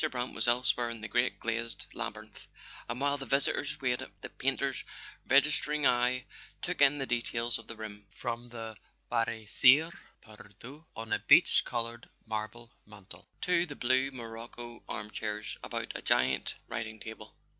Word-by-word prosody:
Brant 125 -2 -3
was - - 0
elsewhere 120 0 +2
in 115 -2 -6
the 110 - -4
great 120 +2 +1
glazed 115 0 -2
laby¬ - - -3
rinth, - - -13 0.4
and 125 - -3
while 140 0 +1
the 135 - -6
visitors 140 +2 +1
waited, 125 -2 0
the - - -6
painter's - - -1 0.5
registering 150 +1 +3
eye 125 +1 +3 0.4
took 180 -4 -2
in 140 0 +7
the 135 -2 -2
details 120 -1 0
of 115 - -13
the 115 - -7
room, 105 -2 -8
from 120 0 -5
the 115 -2 -7 0.3
Barye 115 -2 0
cire 135 +9 +6 0.3
perdue 115 +8 -12
on 110 0 -4
a - - +2
peach - - +7
coloured 120 0 -3 0.2
marble 110 +2 -4 0.2
mantel 105 -2 -13
to 180 -1 +2
the 145 - -7
blue 130 +2 +3
morocco 120 -1 -8
armchairs 105 0 -4
about - - -3
a - - -5
giant 65 +1 +2
writing 110 -1 -5
table. 110 -1 -9
120 Hz, 155 wpm, -31 LUFS, 110-130 Hz, 0.5 s, in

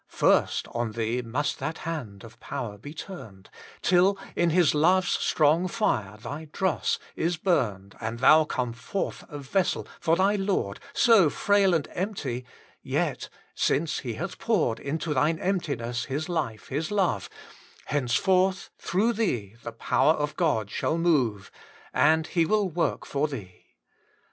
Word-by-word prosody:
8 - - -41
WAITING - - -9
ON - - +7
GOD! - - +6
First - - -4
on 120 -1 -2
thee 115 +2 -1
most 125 +5 -2
that 160 - -3
hand 125 -12 -6
of 115 - -13
power 105 -3 -5
be 145 +8 -9
turned, 130 - -10 0.3
Till 185 +2 +4 0.2
in 170 - +2
Hifl 170 -2 +4
love's 180 +5 +3
strong 160 +4 +2
fire 110 - -1
thy 140 +8 -7
dross 190 -2 0 0.2
is 170 +1 0
homed, 105 - 0
And 110 +1 -4
thon 155 +4 +6
come 125 -4 -2
forth 125 +12 -4
a 150 - -7
vessel 145 +7 -1
for 165 0 +2
thy 195 +3 +2
Lord, 190 - -1
So 220 -9 +5
frail 200 +1 +3
and 155 - -1
empty, 150 - -3 0.4
yet, - - -2 0.2
since 155 +2 0
He 120 -3 -4
hath 175 +4 -5
poured 160 - +1
Into 155 +2 -2
thine 150 +4 +2
emptiness 140 -11 -2
His 145 +4 -3
life, 115 - -3
His 155 +4 -2
love, 185 - 0 0.6
Henceforth 185 +8 +1
through 210 +7 +1
thee 120 - -1
the 115 - -6
power 150 +6 +2
of 150 -1 -3
God 110 - 0
shall 160 - -1
move 130 - +1 0.4
And 160 0 +4
He 170 0 +1
will 210 +1 +2
work/(>r 155 -3 -1
thee. 100 -10 -9
155 Hz, 155 wpm, -27 LUFS, 120-180 Hz, 0.6 s, ON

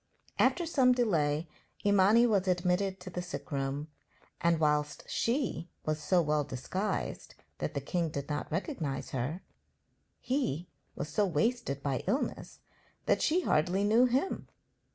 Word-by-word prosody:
After 345 - +3
some 265 -6 +4
delay 165 -10 +1 0.4
Imani 205 +4 +5
was 205 -5 +2
admitted 185 +2 +1
to 185 - -8
the 180 - -3
sick 180 -1 -7
room, 140 +1 -2 0.5
and, 170 -1 +3
whilst 150 -1 +1
she 230 - -1 0.2
was 155 0 -1
so 175 +4 +3
well 150 -1 +1
disguised 145 +10 -3 0.2
that - - -3
the - - -1
king 170 -3 -1
did 140 -2 -4
not 150 0 -3
recognize 155 -5 -3
her, 135 +8 -3 0.8
he 180 - -1 0.3
was 145 - -4
so 205 -1 +2
wasted 170 - 0
by 135 -3 -1
illness 270 - -2 0.4
that - - +2
she 340 +4 +3
hardly 180 - +2
knew 225 +4 +5
him. 265 +10 -1
175 Hz, 140 wpm, -31 LUFS, 150-215 Hz, 0.8 s, Imani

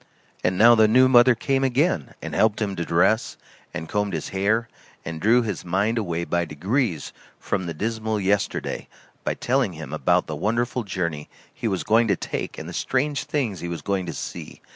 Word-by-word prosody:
And 90 0 +1
now 115 +4 +8
the 110 -2 +5
new 130 +4 +6
mother 125 -1 +6
came 135 +3 0
again, 130 - +1
and - - -5
helped 110 -1 +2
him 100 -3 -2
to 85 - -2
dress, 85 +8 +2 0.3
and 80 - -6
combed 105 0 -1
his 80 - -3
hair, 105 +4 +1 0.4
and 80 -1 -5
drew 120 +4 +4
his 105 -5 -4
mind 100 +6 0
away 85 -5 -2
by 85 0 0
degrees 90 - -2 0.3
from 95 - -2
the 85 - -3
dismal 110 +3 -2
yesterday, 100 +1 -1 0.4
by - - -1
telling 125 -6 0
him 80 -3 -8
about 90 +3 +2
the 80 - -5
wonderful 115 - -1
journey 85 -7 -3 0.2
he 115 - -3
was 95 -4 -1
going 115 +2 +3
to 100 - +3
take - - -5
and - - -7
the - - -7
strange 140 +2 -1
things 120 -11 -2
he 85 - -5
was 85 - -5
going 95 -2 -1
to 85 - -4
see. - - -7
105 Hz, 195 wpm, -24 LUFS, 85-120 Hz, 0.4 s, now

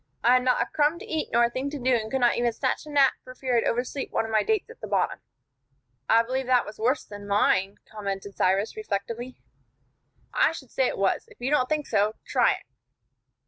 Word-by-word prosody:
I 240 - +6
had 255 0 +4
not 250 -1 +2
a - - -6
crumb 300 +2 +1
to - - -9
eat 315 -1 -3
nor 235 +1 +4
a 235 - +3
thing 260 +3 -3
to 295 - -5
do, 260 -1 +1
and 220 -2 0
could 265 +1 -1
not 240 - +4
even 240 0 +1
snatch 260 +5 -2
a - - -8
nap 280 -2 +4
for 255 - -11
fear 255 -1 -1
I'd 230 - +2
oversleep 250 +3 -2
one - - 0
of 225 - -6
my 215 -1 +3
dates 440 - -1
at 470 - -16
the - - -5
bottom." - - 0 0.9
"I 230 +1 +6
believe 260 +2 -3
that 250 -1 +3
was 215 - -10
worse 250 +6 +1
than 205 -1 -10
mine," 200 -1 +2
commented 200 -2 -5
Cyrus, 195 - +1
reflectively. 240 - -4 1.0
"I - - +3
should 265 -6 -10
say 265 - +2
it - - -3
was. 195 -1 +1
If - - -19
you 250 +3 -2
don't 255 -4 +2
think 305 -1 0
so, 215 0 +1
try - - +3
it." - - -9
245 Hz, 230 wpm, -26 LUFS, 215-270 Hz, 1.0 s, I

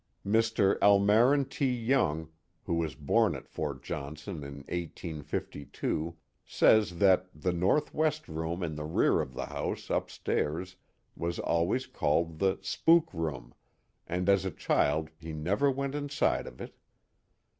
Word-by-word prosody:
Mr. 110 -1 +2
Almarin 105 +8 +5
T. 140 -2 -1
Young, 115 - +1 0.3
who - - -2
was 80 -4 -1
born 70 -1 +2
at - - -9
Fort 70 -4 -5
Johnson 75 +6 -6
in 70 0 -8
1852, 80 -1 -4 0.3
says 105 -6 +3
that 95 -1 +4
the 90 +3 0
northwest 150 - +1
room 80 +3 -3
in 80 -2 -2
the 75 0 -5
rear 75 +2 +2
of 65 - -7
the - - -3
house - - -4
upstairs 90 +5 -2 0.4
was 85 +1 -3
always 85 +10 0
called 80 - 0
the 95 -1 +2
" - - -29
spook 165 - +3
room, 75 -8 -4 0.5
and 90 +2 -2
as 100 -1 +4
a 95 - -1
child 80 -1 0
he 80 0 -7
never 95 - +1
went 140 0 -2
inside 145 -1 0
of - - -11
it. - - -8
90 Hz, 140 wpm, -30 LUFS, 80-110 Hz, 0.5 s, Almarin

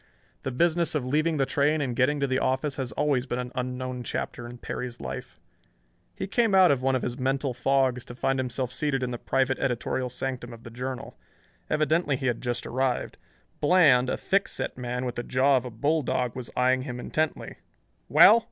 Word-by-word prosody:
The - - -3
business 170 +5 +1
of 140 -4 0
leaving 155 +4 +1
the 135 - +2
train 145 +3 +2
and 130 -5 -2
getting 140 +4 +2
to - - +3
the 130 -1 0
office 135 +2 0
has 130 -4 -3
always 135 0 +1
been 120 - -2
an 125 0 -4
unknown 125 0 -3
chapter 120 0 -4
in 120 +1 -9
Perry's 120 0 -5
life. - - -7 0.8
He - - -3
came 215 +1 +2
out 185 -3 +7
of 135 -3 +1
one 135 0 +2
of 130 - -1
his 125 +2 -3
mental 135 0 0
fogs 130 0 +1
to 120 - -9
find 135 +1 0
himself 125 -1 -2
seated 135 0 0
in 125 - -2
the 120 - -4
private 130 0 0
editorial 125 0 -1
sanctum 125 -1 -4
of 115 0 -13
the 115 - -10
Journal. 125 +2 -6 0.5
Evidently 155 -1 +2
he 130 - -5
had 120 -3 0
just 120 -1 -2
arrived. 130 0 -1 0.4
Bland, 145 -7 +5
a - - -1
thick 195 +1 +1
set - - -4
man 125 0 -3
with 125 - -2
the 120 - -4
jaw 135 +3 +3
of 125 - -2
a - - -4
bulldog, 125 0 0
was 125 -2 -5
eyeing 130 +1 +3
him 125 -2 -5
intently. 155 +4 -2 0.5
"Well! 225 +3 +8
130 Hz, 200 wpm, -27 LUFS, 125-145 Hz, 0.8 s, Well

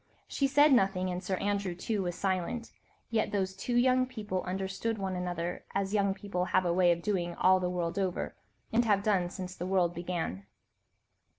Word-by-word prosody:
She 275 - +1
said 290 +1 +5
nothing, 190 -5 +2
and 180 +1 -4
Sir 190 +1 -1
Andrew 200 -2 -1
too 205 +3 -2
was 175 -2 -2
silent, 195 +5 -2 0.4
yet 220 -2 +1
those 190 -2 -1
two 240 +5 -3
young 255 +1 +4
people 210 -7 -3
understood 190 +4 -2
one 190 -2 -2
another, 175 -1 -3
as 195 0 0
young 200 -2 +2
people 195 -3 -2
have 185 0 +2
a 170 - +2
way 180 -1 +4
of 170 0 -1
doing 175 -5 -1
all 185 0 +4
the 180 -1 -1
world 175 0 -2
over, 185 -2 -2 0.4
and 235 +2 +4
have 205 -3 +2
done 190 -5 +2
since 185 0 -6
the 180 - -4
world 180 -2 +2
began. 170 - -4
190 Hz, 190 wpm, -30 LUFS, 180-205 Hz, 0.4 s, said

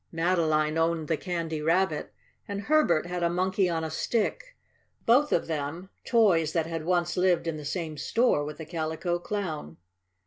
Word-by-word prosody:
Madeline 165 -2 +1
owned 165 -1 +1
the 160 - +1
Candy 165 -2 -3
Rabbit, 165 0 +1 0.4
and 200 0 -4
Herbert 215 - +3
had 175 0 -4
a 170 - +2
Monkey 185 +2 +1
on 165 -1 -1
a 160 - -3
Stick - - -2 0.5
both 280 +6 +4
of - - +2
them 160 +4 -4
toys 185 -10 +3
that 165 -2 +1
had 165 -1 -4
once 175 0 0
lived 180 -2 +2
in 165 -2 -2
the 150 - -8
same 160 -1 -3
store 230 - +2
with 150 0 -6
the 160 - -7
Calico 165 +2 -2
Clown. 165 - -4
170 Hz, 170 wpm, -27 LUFS, 160-185 Hz, 0.5 s, both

